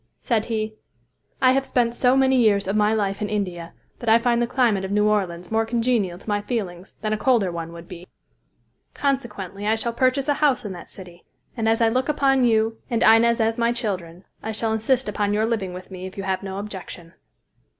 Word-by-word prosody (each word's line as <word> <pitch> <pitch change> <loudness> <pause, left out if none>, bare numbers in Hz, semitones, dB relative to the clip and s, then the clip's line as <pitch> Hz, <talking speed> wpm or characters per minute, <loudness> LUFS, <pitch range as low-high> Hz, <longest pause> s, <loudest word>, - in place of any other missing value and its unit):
Said 225 -3 0
he, 220 -1 -2 0.7
"I 255 - +7
have 270 +1 +2
spent 240 -3 +1
so 250 +2 +3
many 265 0 +4
years 210 -6 +3
of 195 - -1
my 210 0 +3
life 200 -2 -1
in 210 - -2
India 180 -5 -3 0.3
that 235 - -2
I 225 - +7
find 235 0 +1
the 240 - +1
climate 230 -7 +1
of 190 - -4
New 210 +1 +2
Orleans 180 -4 -1
more 225 0 +2
congenial 225 -5 0
to 195 - -17
my 205 -1 0
feelings 195 -5 -5
than 215 0 -1
a 215 - -2
colder 220 -6 +2
one 165 -1 -5
would 170 0 -11
be, 180 0 -10 0.9
consequently 210 -8 -2
I 220 - +3
shall 230 +1 -2
purchase 260 +3 +1
a 290 - +3
house 275 -5 +2
in 205 - -4
that 175 - -11
city, 180 -2 -12 0.3
and 225 -2 0
as 225 +1 +2
I 225 - +5
look 255 +5 0
upon 270 -3 +3
you 225 -1 +1
and 230 -2 +1
Inez 230 +1 +5
as 225 +1 +1
my 235 0 +2
children, 185 -7 -4 0.2
I 220 - -4
shall 220 +1 -1
insist 240 +3 +1
upon 205 0 -1
your 215 +1 +2
living 215 -5 -2
with 180 +2 -10
me 185 0 -6
if 190 - -12
you 195 - -4
have 190 -1 -1
no 195 -1 -6
objection." 190 -4 -8
220 Hz, 220 wpm, -23 LUFS, 195-235 Hz, 0.9 s, I